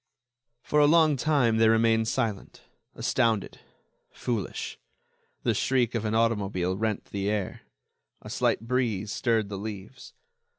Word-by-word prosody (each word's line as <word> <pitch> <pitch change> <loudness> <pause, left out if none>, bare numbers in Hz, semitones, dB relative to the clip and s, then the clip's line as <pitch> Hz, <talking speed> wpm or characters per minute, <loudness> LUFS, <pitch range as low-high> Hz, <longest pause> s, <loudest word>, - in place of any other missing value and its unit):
For 150 - +1
a 145 - +6
long 160 -1 +5
time 130 -5 +2
they 110 0 +5
remained 115 0 +3
silent, 115 -5 -3 0.3
astounded, 115 -5 0 0.5
foolish. 115 -6 -4 0.6
The - - +2
shriek 125 -3 +1
of 115 -2 -2
an 110 +1 0
automobile 100 -5 0
rent 110 +1 -2
the 100 0 -2
air. 105 -3 -3 0.6
A - - -9
slight - - +1
breeze 115 -4 -1
stirred 110 -2 0
the 100 -2 -5
leaves. 110 +4 -8
115 Hz, 130 wpm, -27 LUFS, 105-125 Hz, 0.6 s, a